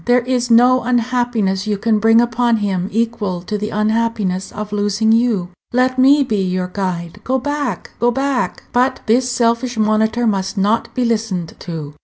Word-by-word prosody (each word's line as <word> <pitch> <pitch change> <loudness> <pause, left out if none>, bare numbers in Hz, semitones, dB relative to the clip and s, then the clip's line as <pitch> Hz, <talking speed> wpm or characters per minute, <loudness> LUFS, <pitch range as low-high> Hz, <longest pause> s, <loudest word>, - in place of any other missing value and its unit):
There 245 +1 +3
is 245 0 -1
no 250 +2 +5
unhappiness 235 -5 0
you 210 -1 0
can 220 +1 +1
bring 225 +2 +5
upon 240 0 +1
him 195 -3 -2
equal 215 -5 -2
to 210 - -4
the 210 +1 -3
unhappiness 215 -3 -1
of 210 0 -6
losing 205 +1 +1
you. 225 -6 +1 0.2
Let 255 +1 +1
me 280 +2 +5
be 215 -6 -1
your 185 -1 -2
guide. 180 -1 -4
Go 260 +1 0
back, 285 -5 -3
go 240 - +3
back!" 270 +1 -1
But 255 +2 +1
this 245 +3 +2
selfish 240 0 0
monitor 220 +2 +1
must 195 -2 -1
not 210 +4 +1
be 250 -1 0
listened 215 -7 -2
to. 155 -4 -7
225 Hz, 170 wpm, -18 LUFS, 200-245 Hz, 0.2 s, no